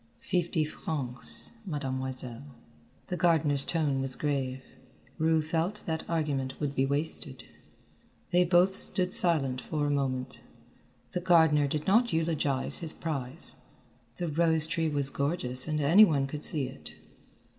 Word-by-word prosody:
"Fifty 175 -3 -1
francs, 130 -6 -3
Mademoiselle." 130 - -5 0.5
The 180 - -4
gardener's 150 -5 +2
tone 145 -5 0
was 135 -1 +2
grave. 135 -3 -2 0.6
Rue 160 0 +2
felt 170 +6 -2
that 160 -1 -4
argument 145 -5 -2
would 145 -2 -2
be 135 -1 0
wasted. 140 -3 -1 0.9
They 180 0 +4
both 180 +2 +3
stood 185 -1 +2
silent 135 -7 +4
for 150 -2 -3
a 145 - 0
moment. 130 -2 -2 0.7
The 180 - -3
gardener 160 -5 +4
did 150 +2 -3
not 230 +4 +3
eulogize 155 -5 0
his 165 -2 -2
prize, 145 -2 -4 0.6
the 175 - -3
rose 160 0 +3
tree 165 0 -1
was 140 -2 +1
gorgeous 140 -3 -1
and 155 -1 -1
any 165 +9 +6
one 145 -9 +2
could 145 +2 -7
see 145 -4 +2
it. - - -12
150 Hz, 135 wpm, -29 LUFS, 135-165 Hz, 0.9 s, any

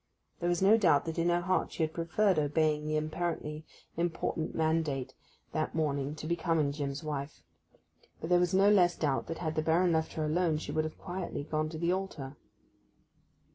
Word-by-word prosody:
There 175 - 0
was 175 +1 +1
no 210 +3 +7
doubt 175 -9 +4
that 165 0 -3
in 170 +1 +2
her 175 0 +2
heart 185 +1 0
she 165 - -1
had 155 0 -1
preferred 175 +2 +1
obeying 150 0 +1
the 155 0 +1
apparently 155 -1 -3 0.3
important 165 -1 -2
mandate 155 -5 0 0.4
that 155 0 -2
morning 145 -2 -1
to 155 - -8
becoming 165 -3 +1
Jim's 140 0 -4
wife; 145 -1 -5 0.8
but 160 - -5
there 175 - +6
was 175 -1 +2
no 200 +2 +6
less 180 -4 +4
doubt 140 -4 -1
that 165 - -4
had 160 -2 -2
the 155 - 0
Baron 170 +3 +3
left 160 -1 0
her 155 - -2
alone 160 0 +1
she 155 - -5
would 155 0 -2
quietly 175 -5 -5
have 150 - -16
gone 155 0 0
to 160 - -6
the 170 +2 +1
altar. 155 -8 -4
160 Hz, 190 wpm, -31 LUFS, 150-175 Hz, 0.8 s, no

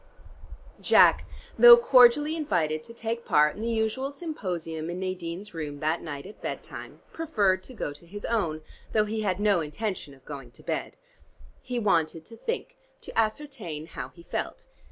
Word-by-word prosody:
Jack, - - +6 0.3
though 480 0 +11
cordially 295 - +5
invited 155 - 0
to 230 - -12
take 230 0 -4
part 150 0 +3
in 210 - -8
the 230 - -1
usual 230 +4 -1
Symposium 175 - -4
in 175 +1 -4
Nadine's 185 +1 -5
room 150 -3 -5
that 155 +2 0
night 145 -3 -6
at 210 - -12
bed - - -4
time, - - -10
preferred 205 -13 +1
to 255 +6 -11
go 145 - -3
to 160 +4 -12
his 205 +4 -7
own, 170 -9 -1 0.3
though 215 -1 +3
he 215 +1 -3
had 190 -3 0
no 205 -3 +3
intention 155 -1 -4
of 135 0 -24
going 140 -4 -8
to - - -10
bed. - - -3 0.6
He 250 -1 -4
wanted 165 -7 +1
to 230 - -11
think, 485 - -4 0.2
to - - -10
ascertain 220 - -2
how - - -7
he 170 - -14
felt. - - -4
200 Hz, 175 wpm, -27 LUFS, 160-235 Hz, 0.6 s, though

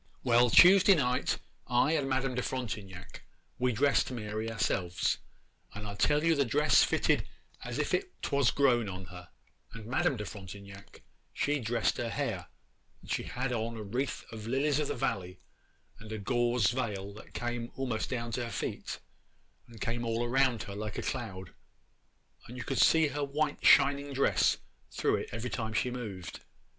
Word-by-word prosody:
Well, 120 -1 +4
Tuesday 190 - +8
night 125 -5 +1 0.3
I 125 +4 +3
and 145 -4 0
Madame 130 0 0
de 125 - -1
Frontignac 105 -8 -5 0.4
we 125 0 +2
dressed 140 +5 +2
Mary 110 -2 -4
ourselves, 95 -5 0 0.6
and 105 +1 -6
I 100 - -5
tell 145 +9 +2
you 165 0 +4
the 140 -3 +2
dress 145 +5 +4
fitted - - +1 0.4
as - - -5
if - - -1 0.3
'twas 140 -3 +2
grown 120 -6 +2
on 95 0 -6
her; 90 -1 -10 0.5
and 115 -2 -8
Madame 125 +2 +1
de 105 - -4
Frontignac 100 -1 -10 0.3
she 145 0 0
dressed 115 -1 0
her 120 - -2
hair, - - -3 0.6
and - - -9
she - - 0
had 125 0 -3
on 115 0 -2
a 110 - -5
wreath 125 +7 -3
of 110 -1 -7
lilies 140 +4 +1
of 150 - 0
the - - -2
valley, 90 -8 -2 0.6
and 110 0 -10
a 110 - -3
gauze 120 +1 +1
veil 105 -6 -3
that 110 - -14
came 120 -1 -3
a'most 125 -5 -2
down 120 -2 -3
to 120 +2 -2
her 115 - -6
feet - - -4 0.7
and 115 -2 -13
came 115 +1 -2
all 115 0 -1
around 125 -3 +2
her 100 - -8
like 105 0 -5
a - - -3
cloud, 95 -7 -5 0.9
and 125 - -9
you 125 - -4
could - - -2
see 160 -2 +5
her 145 +1 -3
white 145 +2 -1
shining 140 0 +5
dress 135 +1 +3 0.3
through - - +1
it - - -5
every 115 +2 -4
time 110 -1 -3
she 125 +4 0
moved. 105 -8 -6
120 Hz, 175 wpm, -31 LUFS, 105-135 Hz, 0.9 s, Tuesday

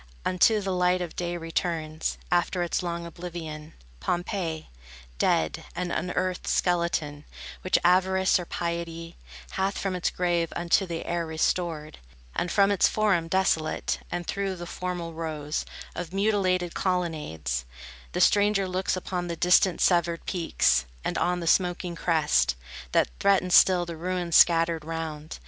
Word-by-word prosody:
Unto 200 +4 +4
the 190 -1 -2
light 180 0 +2
of 175 -2 -5
day 175 0 -2
returns, 165 -1 -2
After 175 0 +1
its 175 - -1
long 170 -1 -4
oblivion, 165 -3 -7 0.3
Pompeii, 175 - -2 0.5
dead, 80 -1 +1
an 180 -1 -2
unearthed 180 0 -2
skeleton, 170 -4 0 0.4
Which 185 - +2
avarice 190 +1 +3
or 175 - -5
piety 170 0 -4 0.4
Hath 195 +1 -1
from 195 -2 -2
its 180 - 0
grave 175 -2 0
unto 175 +3 +2
the 165 -1 -4
air 170 -1 -2
restored; 160 -1 -1 0.4
And 175 - -1
from 200 0 +4
its 200 - +4
forum 200 -6 +1
desolate, 165 -3 0
And 175 0 -3
through 195 0 -2
the 175 -1 -7
formal 175 -1 -4
rows 155 -2 -3 0.3
Of 175 0 -6
mutilated 190 -4 +1
colonnades, 150 - -2 0.5
The - - 0
stranger 205 -1 +4
looks 185 0 -1
upon 180 -1 -3
the 170 - -3
distant, 180 +1 +3
severed 170 -2 +2
peaks, 65 - +1 0.2
And - - -2
on 180 0 0
the - - -4
smoking 175 +1 +1
crest, 160 - +2 0.4
That - - +2
threatens 195 -2 +3
still 180 -2 +6
the 170 -1 -7
ruins 175 0 -2
scattered 165 -1 +5
round. 160 -1 -5
175 Hz, 140 wpm, -26 LUFS, 165-185 Hz, 0.5 s, still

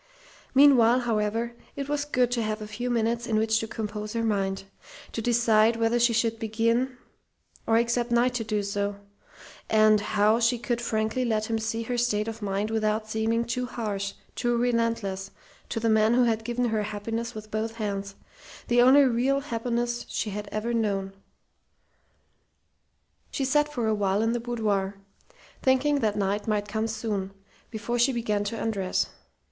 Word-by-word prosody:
Meanwhile, 255 -3 +6
however, 225 0 -1 0.2
it 275 -1 -4
was 295 0 -1
good 250 -4 +1
to 240 -1 0
have 215 0 -2
a 215 - -6
few 225 +4 -4
minutes 235 0 0
in 225 - 0
which 220 0 +2
to 225 - -4
compose 210 -1 -5
her 230 -1 -1
mind, 195 -3 -1 0.5
to 225 - -3
decide 230 -1 +3
whether 230 +1 +1
she 240 0 +4
should 225 0 0
begin, 230 +4 0 0.7
or 225 - +4
expect 235 +1 +1
Knight 240 +1 +3
to 240 -2 -2
do 210 -1 -1
so; 200 0 -2 0.7
and 215 -1 +5
how 215 +2 +2
she 235 +1 +2
could 240 0 -2
frankly 220 +2 -1
let 220 -2 -1
him 225 - +1
see 225 +1 -2
her 245 +1 -2
state 215 -3 0
of 225 0 -6
mind 205 +1 -2
without 215 0 -1
seeming 225 +2 0
too 250 +2 -2
harsh, 205 -4 -3 0.2
too 240 -1 0
relentless, 230 -5 0 0.4
to - - -2
the 230 - 0
man 220 +1 +4
who 250 - +4
had 225 -2 +1
given 240 +2 -1
her 220 -1 0
happiness 225 +3 -4
with 215 0 -9
both 220 +1 -2
hands 200 -3 -4 0.5
the 240 0 +5
only 265 +3 +7
real 260 +2 +2
happiness 240 -2 -2
she 210 - -2
had 205 +1 -5
ever 225 +3 -2
known. 200 -4 -1 2.2
She 275 - -2
sat 295 +2 +2
for 245 -6 -2
a 220 - +2
while 200 0 +1
in 225 - +1
the 240 - -1
boudoir, 210 -5 -1 0.7
thinking 275 +2 +3
that 215 -4 0
Knight 205 +1 -1
might 210 -1 0
come 220 +2 -1
soon, 210 -3 -3 0.4
before 235 +2 -3
she 245 +3 +4
began 215 -4 -1
to 220 +2 -3
undress. 200 -5 0
225 Hz, 170 wpm, -26 LUFS, 215-240 Hz, 2.2 s, only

